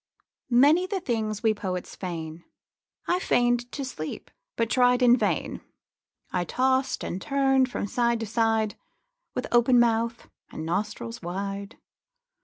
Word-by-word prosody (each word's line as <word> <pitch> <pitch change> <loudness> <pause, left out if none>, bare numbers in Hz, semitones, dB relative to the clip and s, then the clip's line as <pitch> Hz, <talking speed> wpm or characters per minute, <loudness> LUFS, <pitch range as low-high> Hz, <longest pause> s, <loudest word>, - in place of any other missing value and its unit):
Many 290 +9 +5
the 390 0 -2
things 220 - -2
we 220 -1 +4
poets 185 -3 -5
feign. 165 -2 -6 0.6
I 355 - +2
feign'd 245 -6 +1
to 280 - -3
sleep, 155 -12 -6 0.2
but 230 - +1
tried 250 0 +4
in 245 0 +7
vain. - - -1 0.7
I 180 - 0
tost 260 +8 0
and 185 - -4
turn'd 270 -2 +2
from 245 - -3
side 235 +2 +1
to - - -2
side, 225 -1 +1 0.6
With - - -2
open 240 +1 +5
mouth 230 0 +1 0.2
and 155 - -6
nostrils 210 +6 -3
wide. 195 +3 -5
230 Hz, 135 wpm, -26 LUFS, 200-250 Hz, 0.7 s, in